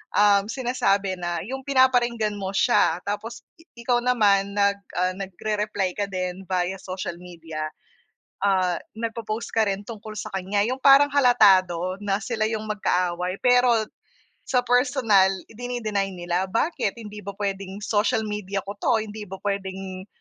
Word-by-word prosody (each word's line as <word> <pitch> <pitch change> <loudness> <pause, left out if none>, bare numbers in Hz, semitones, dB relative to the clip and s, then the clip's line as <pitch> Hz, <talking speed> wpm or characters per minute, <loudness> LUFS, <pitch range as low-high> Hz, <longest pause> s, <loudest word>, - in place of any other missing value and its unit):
um, 205 -1 +5
sinasabi 200 -7 0
na 175 -1 -2
yung 265 +2 -5
pinaparinggan 245 -5 +2
mo 195 -1 -4
siya 195 -5 +3
tapos, 215 +3 -4 0.3
ikaw 240 +1 +1
naman 205 -5 +3
nag, 200 0 +2 0.2
ah, 185 0 +1
nagre-reply 195 0 -2
ka 200 -1 -3
din 185 0 -3
via 185 0 -1
social 185 -2 -5
media. 165 -3 -7 0.8
Ah, 185 -3 +2 0.2
nag 225 0 -4
po-post 225 +1 -4
ka 225 -1 +2
rin 200 -1 -2
tungkol 215 -1 -8
sa - - -5
kanya 195 +2 0
yung 255 +3 -1
parang 280 +1 +7
halatado 190 -9 +4
na 200 0 -1
sila 215 +1 -1
yung 220 -1 -3
magkaaway 180 -3 -1
pero. 245 -2 +4 0.7
Sa 250 -1 +2
personal 245 -6 +3 0.2
idini-deny 220 -4 -3
nila 175 +1 -1
bakit 215 - -1
hindi 210 -3 -9
ba 200 -1 -7
pwedeng 195 0 -4
social 215 +1 +1
media 205 -2 -3
ko 200 +1 -8
'to 220 +1 +2
hindi 210 0 -8
ba 190 0 -9
pwedeng, 190 -1 -4
205 Hz, 145 wpm, -24 LUFS, 190-230 Hz, 0.8 s, parang